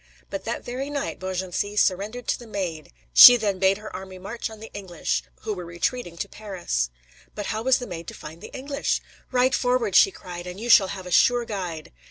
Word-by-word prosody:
But 195 - -5
that 235 - -4
very 260 +3 -4
night 285 -1 -3
Beaugency 190 +2 -3
surrendered 210 +5 0
to - - +1
the 240 - -11
Maid! 180 -7 -4 0.2
She 245 0 +11
then 205 -4 -1
bade 190 +1 +3
her 215 0 -9
army 190 0 -8
march 210 +6 -5
on 220 -1 -11
the 220 - -10
English, 190 -5 -2 0.2
who 215 -1 -3
were 180 -3 -6
retreating 170 +2 -3
to 200 - -3
Paris. 185 - -3 0.5
But 205 - -4
how 215 - -2
was 260 +2 +3
the 245 - -6
Maid 170 -5 -7
to - - -7
find 160 +3 -10
the - - -8
English? 275 +1 -2 0.3
"Ride 255 0 +3
forward," 245 -6 +1
she - - +8
cried, 180 - -9
"and 180 +2 -7
you 235 +2 -5
shall 195 -4 +7
have 185 0 -7
a 180 - -7
sure 245 +6 +4
guide." 180 -7 -5
200 Hz, 215 wpm, -24 LUFS, 180-240 Hz, 0.5 s, She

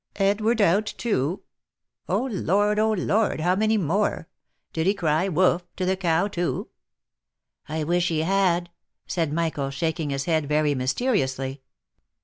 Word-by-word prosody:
" - - -47 0.2
Edward 220 +2 0
out 200 +3 +3
too! 180 - -1 0.7
Oh! - - +1
Lord, 205 -2 +1
oh! 220 0 +3
Lord, 205 0 +1
how 175 +3 +2
many 215 +2 +2
more? 185 -1 0 0.5
Did 160 +2 0
he 200 - +3
cry 160 -1 +1
'Wough 180 0 +3
!' - - -50
to 185 - -1
the 190 +1 +1
cow, 175 0 +1
too 175 -4 -3 0.4
?" - - -64
" - - -62 0.2
I 155 0 -2
wish 175 +3 +1
he 160 -2 0
had 175 -1 +1 0.2
!" - - -59
said 165 -4 -1
Michael, 155 -4 -1
shaking 160 +2 -2
his 140 0 -2
head 160 -3 +1
very 150 0 +2
myste 130 - -1
riously. 135 - 0
175 Hz, 170 wpm, -24 LUFS, 155-200 Hz, 0.7 s, out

